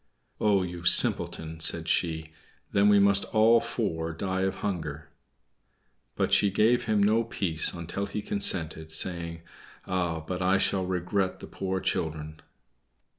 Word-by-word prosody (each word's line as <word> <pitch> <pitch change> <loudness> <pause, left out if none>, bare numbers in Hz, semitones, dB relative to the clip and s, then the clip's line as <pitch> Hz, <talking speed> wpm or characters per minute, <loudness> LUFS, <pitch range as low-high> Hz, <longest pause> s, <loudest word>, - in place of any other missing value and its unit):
"Oh, 100 -3 +2
you 90 -1 -7
simpleton!" 80 -2 +1
said 80 0 +1
she. 80 -2 -1 0.4
"Then 100 +1 +4
we 105 - +6
must 100 0 +4
all 115 +1 +4
four 85 -9 -3
die 95 +3 -3
of 95 0 -1
hunger." 80 -6 -4 1.1
But - - -1
she 100 - +4
gave 110 +5 +2
him 105 -2 +2
no 110 +3 +3
peace 85 -8 0
until 85 +4 -5
he 105 +1 -5
consented, 80 -5 0
saying, 85 0 -2 0.4
"Ah, 90 -3 -1
but 90 +3 -5
I 95 +1 +3
shall 95 -1 0
regret 95 +1 -1
the - - -9
poor 95 -1 -4
children." 80 -3 -3
90 Hz, 140 wpm, -27 LUFS, 80-100 Hz, 1.1 s, we